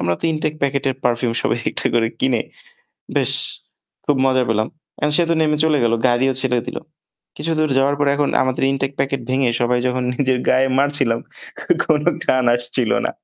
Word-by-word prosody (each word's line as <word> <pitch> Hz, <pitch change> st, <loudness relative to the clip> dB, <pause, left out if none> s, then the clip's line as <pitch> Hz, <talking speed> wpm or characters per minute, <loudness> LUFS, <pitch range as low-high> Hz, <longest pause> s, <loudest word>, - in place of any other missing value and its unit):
আমরা 85 Hz, -1 st, 0 dB
তো -, -, -7 dB
ইনটেক 155 Hz, -1 st, -1 dB
প্যাকেটের 140 Hz, -1 st, 0 dB
পারফিউম 120 Hz, 0 st, +1 dB
সবাই -, -, 0 dB
একটা -, -, -1 dB
করে 115 Hz, -1 st, +2 dB
কিনে 130 Hz, -3 st, +1 dB, 0.8 s
বেশ -, -, +2 dB, 0.7 s
খুব 145 Hz, -, +2 dB
মজা 130 Hz, -1 st, +3 dB
পেলাম। 110 Hz, -1 st, +1 dB, 0.3 s
অ্যা -, -, +1 dB
সে 175 Hz, -, +4 dB
তো -, -, +3 dB
নেমে 150 Hz, -1 st, +1 dB
চলে 155 Hz, -2 st, +3 dB
গেল। 115 Hz, -1 st, +2 dB
গাড়িও 125 Hz, +2 st, +2 dB
ছেড়ে 125 Hz, -2 st, +1 dB
দিল। -, -, -5 dB, 0.6 s
কিছুদূর 155 Hz, 0 st, 0 dB
যাওয়ার 140 Hz, +1 st, +2 dB
পর 145 Hz, -, +2 dB
এখন 145 Hz, 0 st, 0 dB
আমাদের 130 Hz, 0 st, -1 dB
ইনটেক 135 Hz, 0 st, -1 dB
প্যাকেট 135 Hz, -1 st, -1 dB
ভেঙে 130 Hz, -1 st, +2 dB
সবাই 120 Hz, +1 st, +2 dB
যখন 125 Hz, 0 st, -1 dB
নিজের 130 Hz, -1 st, +1 dB
গায়ে 130 Hz, +1 st, +3 dB
মারছিলাম 140 Hz, -5 st, +1 dB, 0.7 s
কোনো 150 Hz, -2 st, +1 dB, 0.2 s
ঘ্রাণ 130 Hz, -1 st, +1 dB
আসছিল 120 Hz, -2 st, 0 dB
না। -, -, +1 dB
130 Hz, 175 wpm, -19 LUFS, 120-145 Hz, 0.8 s, সে